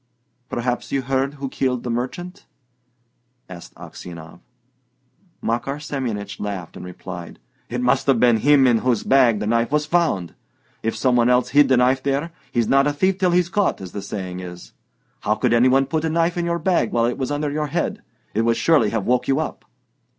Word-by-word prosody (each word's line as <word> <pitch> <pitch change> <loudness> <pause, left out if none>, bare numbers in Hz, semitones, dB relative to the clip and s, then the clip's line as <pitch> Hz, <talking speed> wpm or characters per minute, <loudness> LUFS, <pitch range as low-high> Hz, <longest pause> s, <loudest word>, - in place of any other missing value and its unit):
"Perhaps 125 +1 -2
you 135 -1 0
heard 135 +2 -1
who 140 -1 -5
killed 130 -2 -1
the 120 - -3
merchant?" 130 +10 -5 1.0
asked 90 -2 -11
Aksionov. 85 -1 -10 1.0
Makar 120 +4 -1
Semyonich 115 -9 -4
laughed, 100 -5 -5
and - - -8
replied: 90 -1 -8 0.3
"It 125 +1 -3
must 130 +2 +1
have 135 -4 +4
been 120 -1 +5
him 140 +3 +5
in 120 -3 +4
whose 125 -3 0
bag 125 -5 +4
the 105 - -3
knife 115 +2 +1
was 150 0 +1
found! 155 - 0 0.5
If 115 - -2
some 130 -2 +2
one 120 0 +4
else 125 0 +3
hid 145 0 +5
the 130 - +4
knife 130 +2 +3
there, 140 +5 -1 0.2
'He's 120 -4 +1
not 135 +1 +4
a 145 - +1
thief 190 +6 +1
till 185 -1 +3
he's 175 0 +2
caught,' 200 +2 0
as 95 -2 -8
the 100 - -5
saying 95 -2 -5
is. 90 -1 -9 0.5
How 105 - 0
could 120 +1 +1
any 120 +2 +5
one 135 +1 +3
put 155 +3 -2
a 160 - 0
knife 165 +1 +1
into 170 -1 -1
your 170 - 0
bag 170 -9 +1
while 115 -1 +2
it 120 +3 -2
was 130 - -2
under 145 0 -1
your 150 +1 -2
head? 160 +5 -2 0.3
It 110 - +1
would 115 0 +2
surely 120 -3 +3
have 110 -2 -2
woke 125 0 +1
you 135 +2 +2
up." 155 - -5
125 Hz, 200 wpm, -21 LUFS, 115-145 Hz, 1.0 s, been